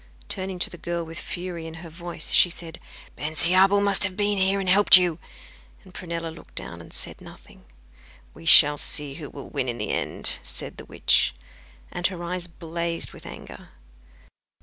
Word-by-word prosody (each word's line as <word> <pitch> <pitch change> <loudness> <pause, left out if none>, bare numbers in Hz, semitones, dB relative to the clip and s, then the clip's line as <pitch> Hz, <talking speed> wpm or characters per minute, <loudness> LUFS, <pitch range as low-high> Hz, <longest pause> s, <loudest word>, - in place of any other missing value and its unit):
Turning 190 0 -3
to 180 - -1
the 175 - -10
girl, 170 0 -3
with 165 0 -8
fury 175 -2 -6
in 160 - -9
her 165 +1 -10
voice, 170 -1 -3
she 180 - +5
said: 165 -1 -6 0.4
'Bensiabel 180 +6 +4
must 200 -1 +3
have 190 0 0
been 205 -1 +1
here 190 +1 +2
and 195 - -4
helped 195 +1 +8
you;' 175 -3 0 0.6
and 185 -2 -17
Prunella 170 -2 -5
looked - - -16
down, - - -6
and - - -14
said - - -5
nothing. - - -15 0.7
'We 165 - -12
shall 150 -2 +8
see 145 -2 +2
who 150 -1 -8
will 140 - -10
win 135 -3 -2
in 120 - -4
the 105 - -3
end,' - - -2
said 60 -1 -5
the - - -10
witch, - - +2 0.6
and 175 - -1
her 180 -3 -7
eyes 175 0 -4
blazed 170 0 -3
with - - -11
anger. - - -11
170 Hz, 180 wpm, -24 LUFS, 160-185 Hz, 0.7 s, helped